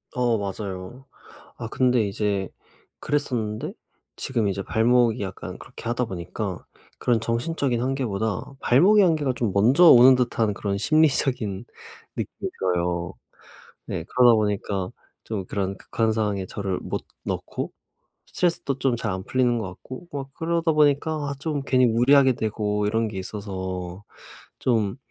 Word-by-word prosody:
어 120 -2 +2
맞아요. 100 +4 -6 0.5
아 115 - -5
근데 125 +1 +2
이제 100 -2 -1 0.5
그랬었는데 120 -7 -2 0.4
지금 115 -5 -1
이제 100 0 -2
발목이 120 +1 +2
약간 95 -2 -6
그렇게 - - -12
하다 120 +2 -1
보니까 90 -6 -5 0.3
그런 120 -2 +1
정신적인 120 +2 -1
한계보다 115 -5 -2
발목의 195 - +5
한계가 155 -7 +2
좀 115 -5 -1
먼저 125 - +5
오는 130 -4 +9
듯한 115 -4 +1
그런 100 -1 -2
심리적인 135 -8 +2 0.5
느낌이 - - -5
들어요. 90 -1 -1 0.7
네 80 - -4
그러다 125 -2 +6
보니까 100 -3 -1 0.4
좀 105 -4 -4
그런 95 0 -2
극한 110 +3 -1
상황에 105 -3 -1
저를 95 -2 -3
못 - - -4 0.2
넣고 - - -4 0.6
스트레스도 165 -6 -1
좀 125 -1 +1
잘 115 -2 -2
안 95 0 -5
풀리는 125 0 +1
것 110 -4 -3
같고 130 - -10
막 135 -1 -5
그러다 165 +1 0
보니까 150 0 +3 0.2
아 - - -2
좀 150 -1 -2
괜히 130 -2 +3
무리하게 130 +3 +5
되고 105 -2 -1
이런 110 +2 +1
게 105 -3 -6
있어서 95 -2 -5 0.6
좀 110 -5 +1
115 Hz, 295 characters per minute, -24 LUFS, 100-130 Hz, 0.7 s, 오는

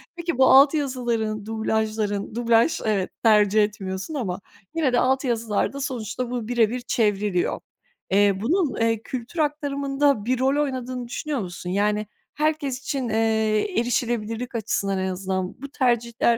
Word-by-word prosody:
Peki, 340 -4 -3
bu 260 - +6
alt 275 +3 +7
yazıların, 240 -7 -1
dublajların 220 -2 -1
dublaj 235 +4 +3
evet, 200 -4 0
tercih 210 -1 +5
etmiyorsun 195 +4 -4
ama 200 -10 -3 0.4
yine 300 -6 +1
de 245 - +4
alt 265 +2 +2
yazılarda 235 +2 -1
sonuçta 245 -2 -3
bu 240 -3 -3
bire 235 -3 +3
bir 250 +2 -4
çevriliyor. 205 -6 0 0.5
Eee, 200 +1 +5
bunun, 300 - 0
eee, 225 -1 +1
kültür 255 +6 -6
aktarımında 280 -4 0
bir 255 +1 0
rol 275 +3 +2
oynadığını 255 -3 -4
düşünüyor 285 +3 -3
musun? 180 -2 -6
Yani, 210 +2 0 0.3
herkes 295 -3 -1
için, 270 -3 -3
eee, 220 - +1
erişilebilirlik 240 0 -2
açısından 200 -3 -1
en 190 0 -1
azından 185 +2 -3
bu 280 - -6
tercihler 235 -3 +1
235 Hz, 145 wpm, -24 LUFS, 210-265 Hz, 0.5 s, alt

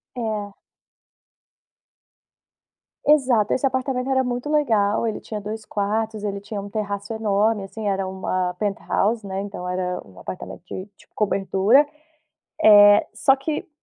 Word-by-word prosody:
É. 215 -4 -4 2.5
Exato, 260 -8 +4
esse 260 - 0
apartamento 260 0 -1
era 260 -1 +2
muito 245 +3 -3
legal 225 -8 +2
ele 220 - -3
tinha 215 - -6
2 215 +2 -6
quartos, 215 +1 -2
ele 200 -1 -3
tinha 205 0 -6
um 205 - -8
terraço 205 0 -4
enorme, 215 -1 +1
assim, 210 +2 -6
era 195 -1 0
uma 185 -1 -2
penthouse, 210 +2 -1
né, 190 -1 -4
então 200 -3 -6
era 180 0 -2
um 95 -2 -16
apartamento 175 - -8
de 185 +1 -6
de - - -21
cobertura, 205 +6 +3 0.8
eh, 205 -1 +8
só 270 0 +4
que 305 +6 -4
210 Hz, 135 wpm, -23 LUFS, 200-235 Hz, 2.5 s, eh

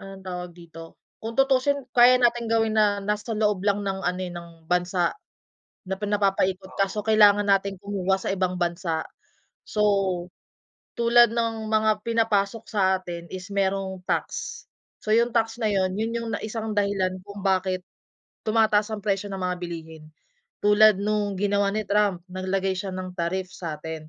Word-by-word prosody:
anong 195 -1 -11
tawag 180 -1 -6
dito, 165 -1 -12 0.2
kung 225 +1 -5
tutuusin 270 +1 +2
kaya 245 +1 +8
nating 240 -1 +2
gawin 225 -1 +2
na 205 -1 +3
nasa 210 +2 -2
loob 210 -3 +1
lang 205 0 +2
ng 195 -1 -2
ano, 180 +1 -1
eh, 180 - -6
ng 170 0 -8 0.2
bansa, 180 0 +1 0.8
na 190 - -2
pin 210 0 -4
napapaikot 190 -2 0
kaso 195 +1 0
kailangan 205 -2 +5
nating 195 0 +2
kumuha 195 -2 0
sa - - -4
ibang 185 -1 -1
bansa. 170 -2 -1 0.6
So, 210 - -1 1.2
tulad 235 0 +6
ng 225 -2 -1
mga 215 -1 +2
pinapasok 225 -1 +1
sa 190 -3 +2
atin 170 -2 -7
is 185 +2 -7
merong 195 -1 -1
tax, - - -3 0.4
so 215 - -6
yung 235 +2 +3
tax 225 0 +1
na 220 - +1
'yon, 190 -2 +1
'yon 220 +2 -1
yung 230 -1 -3
na - - -9
isang 220 0 -4
dahilan 195 -2 0
kung 200 -1 -9
bakit 185 -1 +1 0.6
tumataas 220 -1 +2
ang 210 - -5
presyo 200 -1 -1
ng 190 - -5
mga 180 0 -1
bilihin 165 -3 -8 0.6
tulad 210 0 +6
nung 205 0 -1
ginawa 200 +1 +1
ni 215 +2 -1
Trump, 200 -4 +1
naglagay 190 +1 -1
siya 190 +1 -4
ng 185 -1 -5
tariff 180 +2 -3
sa'tin. 160 -1 -6
200 Hz, 160 wpm, -25 LUFS, 185-215 Hz, 1.2 s, kaya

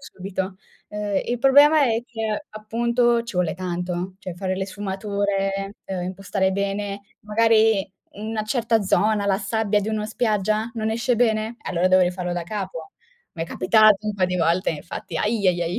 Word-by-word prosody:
subito. 190 -5 -5 0.3
Ehm, 210 -1 -2
il 240 0 -1
problema 285 +3 +6
è 230 -1 +1
che, 225 +2 -3
appunto, 235 +2 +1
ci 235 -3 -9
vuole 180 -2 +1
tanto, 180 0 -4
cioè 185 - -6
fare 185 0 -2
le 190 0 -2
sfumature, 195 0 -2
uhm, 185 -2 -3
impostare 190 +1 -1
bene, 200 0 -2 0.2
magari 220 0 +3 0.3
in 210 +2 -7
una 220 -1 -2
certa 225 0 +1
zona, 205 +1 +2
la 195 -1 +3
sabbia 210 0 0
di 205 - -3
una 215 -1 -2
spiaggia, 215 0 0
non 220 -1 -2
esce 235 +3 +1
bene? 220 -1 +1
Allora 180 0 0
devo 185 0 +5
rifarlo 180 0 -1
da 175 -1 -2
capo. 185 -4 -6 0.4
M'è 165 -2 -4
capitato 215 +4 +4
un 210 - -1
po' 190 -2 +1
di 180 0 -1
volte, 170 +2 +2
infatti 165 +1 -6
ahi 210 +2 0
ahi 175 -1 +1
ahi. 170 +2 -2
205 Hz, 170 wpm, -23 LUFS, 185-220 Hz, 0.4 s, problema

